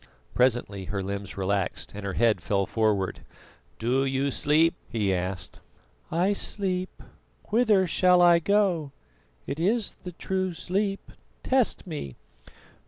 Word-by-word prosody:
Presently 120 Hz, -6 st, +1 dB
her 100 Hz, +1 st, -3 dB
limbs 100 Hz, 0 st, -5 dB
relaxed, 95 Hz, -1 st, -2 dB
and 105 Hz, 0 st, -7 dB
her 100 Hz, -1 st, -3 dB
head 110 Hz, -5 st, +2 dB
fell 100 Hz, +1 st, 0 dB
forward. 105 Hz, -4 st, 0 dB, 0.6 s
"Do 125 Hz, +4 st, +1 dB
you 135 Hz, +1 st, 0 dB
sleep?" 155 Hz, +4 st, +3 dB, 0.2 s
he 105 Hz, -5 st, 0 dB
asked. 90 Hz, 0 st, -4 dB, 0.5 s
"I 180 Hz, +5 st, +2 dB
sleep. 185 Hz, -2 st, -2 dB, 0.5 s
Whither 215 Hz, -4 st, +3 dB
shall 180 Hz, +1 st, +4 dB
I 175 Hz, -1 st, +6 dB
go? 175 Hz, -6 st, +1 dB, 0.5 s
It 145 Hz, -, -4 dB
is 210 Hz, +5 st, 0 dB
the 180 Hz, -1 st, -8 dB
true 185 Hz, +1 st, -2 dB
sleep 195 Hz, +4 st, -2 dB, 0.3 s
test 260 Hz, -3 st, +1 dB
me." 145 Hz, -, -6 dB
145 Hz, 125 wpm, -26 LUFS, -, 0.6 s, I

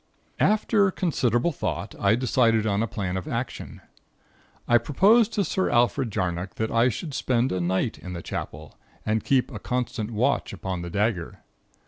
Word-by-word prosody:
"After 210 Hz, -1 st, +3 dB
considerable 140 Hz, -, 0 dB
thought, -, -, -4 dB
I 100 Hz, +2 st, +3 dB
decided 115 Hz, -3 st, +2 dB
on 100 Hz, -1 st, +1 dB
a 115 Hz, -, 0 dB
plan 95 Hz, -3 st, -3 dB
of 95 Hz, -, -5 dB
action. -, -, -5 dB, 0.9 s
I 120 Hz, 0 st, +5 dB
proposed 205 Hz, -, +4 dB
to 205 Hz, -, +1 dB
Sir 190 Hz, 0 st, 0 dB
Alfred 120 Hz, +1 st, +2 dB
Jarnock 90 Hz, -2 st, -3 dB
that 110 Hz, -, -2 dB
I 115 Hz, +2 st, +4 dB
should 150 Hz, +3 st, -5 dB
spend 125 Hz, -1 st, +1 dB
a 90 Hz, -, -1 dB
night 95 Hz, +6 st, -1 dB
in 90 Hz, -, -7 dB
the 85 Hz, -2 st, -6 dB
Chapel, 75 Hz, +1 st, -7 dB, 0.3 s
and 110 Hz, 0 st, 0 dB
keep 135 Hz, -2 st, +1 dB
a -, -, -6 dB
constant 125 Hz, -3 st, -2 dB
watch 110 Hz, -2 st, 0 dB
upon 95 Hz, -2 st, -4 dB
the 85 Hz, -, -5 dB
dagger. 100 Hz, -2 st, -1 dB
115 Hz, 165 wpm, -25 LUFS, 95-130 Hz, 0.9 s, I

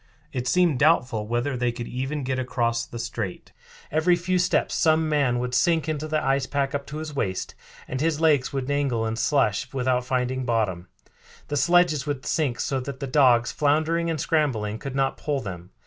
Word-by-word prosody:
It 125 Hz, -1 st, -3 dB
seemed 175 Hz, -4 st, +3 dB
doubtful 125 Hz, -9 st, +2 dB
whether 120 Hz, +4 st, -1 dB
they 125 Hz, -1 st, 0 dB
could 120 Hz, 0 st, -6 dB
even 135 Hz, +3 st, -3 dB
get 130 Hz, 0 st, -1 dB
across 120 Hz, -2 st, -1 dB
the 120 Hz, -, -8 dB
strait. 115 Hz, -5 st, -5 dB, 0.4 s
Every 160 Hz, +4 st, +3 dB
few 180 Hz, +1 st, 0 dB
steps 180 Hz, 0 st, +1 dB
some 160 Hz, 0 st, +3 dB
man 140 Hz, -5 st, +1 dB
would 125 Hz, +1 st, -3 dB
sink 165 Hz, +3 st, +2 dB
into 155 Hz, -1 st, -2 dB
the 155 Hz, -3 st, -1 dB
ice 135 Hz, 0 st, +1 dB
pack 140 Hz, -2 st, -1 dB
up 140 Hz, -1 st, -3 dB
to 150 Hz, -, -6 dB
his 155 Hz, -1 st, -6 dB
waist 95 Hz, -8 st, -2 dB, 0.3 s
and 130 Hz, +1 st, -3 dB
his 160 Hz, -1 st, +1 dB
legs 150 Hz, -5 st, +3 dB
would 135 Hz, -2 st, -2 dB
dangle 140 Hz, -5 st, 0 dB
in 110 Hz, 0 st, -2 dB
slush 125 Hz, 0 st, +1 dB
without 125 Hz, -1 st, 0 dB
finding 130 Hz, +1 st, -1 dB
bottom. 105 Hz, -7 st, -1 dB, 0.6 s
The 145 Hz, -, -1 dB
sledges 155 Hz, -1 st, +3 dB
would 145 Hz, -3 st, -3 dB
sink 145 Hz, -7 st, 0 dB
so 135 Hz, -, -1 dB
that 135 Hz, +1 st, -6 dB
the -, -, -3 dB
dogs, 125 Hz, -4 st, +4 dB
floundering 160 Hz, +3 st, +1 dB
and 160 Hz, -2 st, -2 dB
scrambling, 125 Hz, -10 st, 0 dB
could 135 Hz, +1 st, -6 dB
not 135 Hz, -1 st, 0 dB
pull 145 Hz, -2 st, -2 dB
them. 90 Hz, -5 st, -7 dB
135 Hz, 195 wpm, -25 LUFS, 120-150 Hz, 0.6 s, dogs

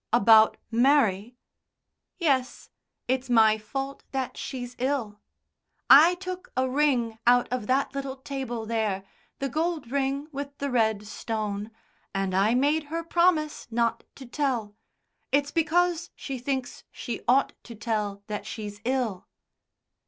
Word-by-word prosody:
"About 220 Hz, -1 st, +6 dB
Mary?" 240 Hz, -3 st, +2 dB, 0.8 s
"Yes. 275 Hz, -8 st, 0 dB, 0.4 s
It's 260 Hz, +1 st, -1 dB
my 220 Hz, -2 st, +5 dB
fault 270 Hz, +6 st, -5 dB
that 265 Hz, -1 st, -2 dB
she's 250 Hz, -2 st, -6 dB
ill. 250 Hz, -6 st, -1 dB, 0.7 s
I 315 Hz, +6 st, +9 dB
took 370 Hz, 0 st, -7 dB
a 260 Hz, 0 st, +2 dB
ring 255 Hz, -5 st, +1 dB
out 245 Hz, 0 st, +5 dB
of 250 Hz, -4 st, -3 dB
that 265 Hz, +2 st, +1 dB
little 275 Hz, -1 st, -4 dB
table 265 Hz, -4 st, -5 dB
there 215 Hz, -4 st, -1 dB, 0.3 s
the 275 Hz, -, -2 dB
gold 315 Hz, -2 st, -2 dB
ring 275 Hz, +1 st, -1 dB
with 280 Hz, 0 st, -6 dB
the 280 Hz, -1 st, -3 dB
red 220 Hz, -4 st, +1 dB
stone 215 Hz, -1 st, -4 dB, 0.5 s
and 195 Hz, -1 st, -1 dB
I 200 Hz, +5 st, +3 dB
made 295 Hz, +4 st, +2 dB
her 330 Hz, +3 st, -4 dB
promise 335 Hz, -3 st, +1 dB
not 235 Hz, 0 st, 0 dB
to 270 Hz, -, -10 dB
tell. 240 Hz, -5 st, -2 dB, 0.6 s
It's 285 Hz, +1 st, +2 dB
because 345 Hz, +1 st, +1 dB
she 270 Hz, -2 st, -6 dB
thinks 260 Hz, 0 st, -3 dB
she 240 Hz, -, -5 dB
ought 265 Hz, +3 st, +3 dB
to 235 Hz, -, -9 dB
tell 210 Hz, -2 st, -3 dB
that 210 Hz, 0 st, -5 dB
she's 205 Hz, -1 st, -7 dB
ill." 245 Hz, -7 st, -1 dB
255 Hz, 135 wpm, -26 LUFS, 220-280 Hz, 0.8 s, I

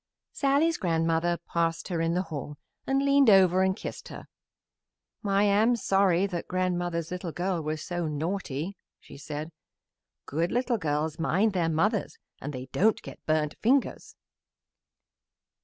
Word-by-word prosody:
Sallie's 290 Hz, +4 st, +2 dB
grandmother 165 Hz, -1 st, +1 dB
passed 165 Hz, +1 st, -1 dB
her 170 Hz, -3 st, -1 dB
in 165 Hz, +1 st, 0 dB
the 180 Hz, -, +1 dB
hall 150 Hz, -3 st, -7 dB, 0.3 s
and 270 Hz, +1 st, +1 dB
leaned 280 Hz, -3 st, +5 dB
over 190 Hz, -2 st, +6 dB
and 190 Hz, 0 st, +2 dB
kissed -, -, -7 dB
her. -, -, -9 dB, 1.0 s
"I 200 Hz, -1 st, +2 dB
am 210 Hz, +4 st, +4 dB
sorry 195 Hz, -4 st, +2 dB
that 175 Hz, -4 st, -4 dB
grandmother's 175 Hz, -2 st, -1 dB
little 180 Hz, -1 st, -4 dB
girl 180 Hz, 0 st, -2 dB
was 155 Hz, 0 st, -3 dB
so 175 Hz, -2 st, -3 dB
naughty," 160 Hz, +2 st, -3 dB, 0.2 s
she -, -, -14 dB
said. 150 Hz, +2 st, -6 dB, 0.7 s
"Good 165 Hz, +5 st, -1 dB
little 245 Hz, -1 st, 0 dB
girls 155 Hz, -1 st, -1 dB
mind 195 Hz, +6 st, +2 dB
their 170 Hz, -3 st, +1 dB
mothers 200 Hz, +7 st, 0 dB, 0.2 s
and 145 Hz, -, -4 dB
they 130 Hz, -2 st, -6 dB
don't 215 Hz, +3 st, +3 dB
get -, -, -11 dB
burnt 155 Hz, -1 st, +1 dB
fingers." 265 Hz, +4 st, +1 dB
175 Hz, 140 wpm, -27 LUFS, 160-200 Hz, 1.0 s, over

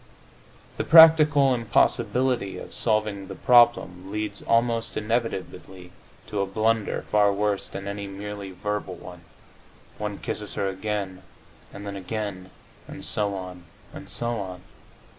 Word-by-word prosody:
The -, -, -1 dB
practical 155 Hz, -4 st, +7 dB
impossibility 120 Hz, -1 st, +1 dB
of -, -, -9 dB
solving 105 Hz, -3 st, 0 dB
the 95 Hz, -, -7 dB
problem 110 Hz, -6 st, +3 dB
leads 105 Hz, 0 st, -3 dB
almost 115 Hz, 0 st, +1 dB
inevitably 105 Hz, -5 st, -4 dB, 0.3 s
to 105 Hz, -, -3 dB
a 100 Hz, -, -1 dB
blunder 110 Hz, +2 st, 0 dB
far 105 Hz, -1 st, +4 dB
worse 100 Hz, 0 st, -1 dB
than 100 Hz, 0 st, -7 dB
any 100 Hz, 0 st, -5 dB
merely 100 Hz, 0 st, -7 dB
verbal 95 Hz, 0 st, -4 dB
one: 90 Hz, 0 st, -11 dB, 0.8 s
one 105 Hz, -1 st, -3 dB
kisses 105 Hz, -1 st, -5 dB
her 100 Hz, -, -1 dB
again, 95 Hz, -1 st, -4 dB, 0.5 s
and 100 Hz, +1 st, -9 dB
then 100 Hz, 0 st, -5 dB
again, 100 Hz, -1 st, -5 dB, 0.4 s
and -, -, -8 dB
so 100 Hz, -2 st, -1 dB
on, 90 Hz, -2 st, -8 dB, 0.3 s
and -, -, -10 dB
so 120 Hz, 0 st, -2 dB
on. 90 Hz, -2 st, -7 dB
105 Hz, 130 wpm, -25 LUFS, 95-115 Hz, 0.8 s, practical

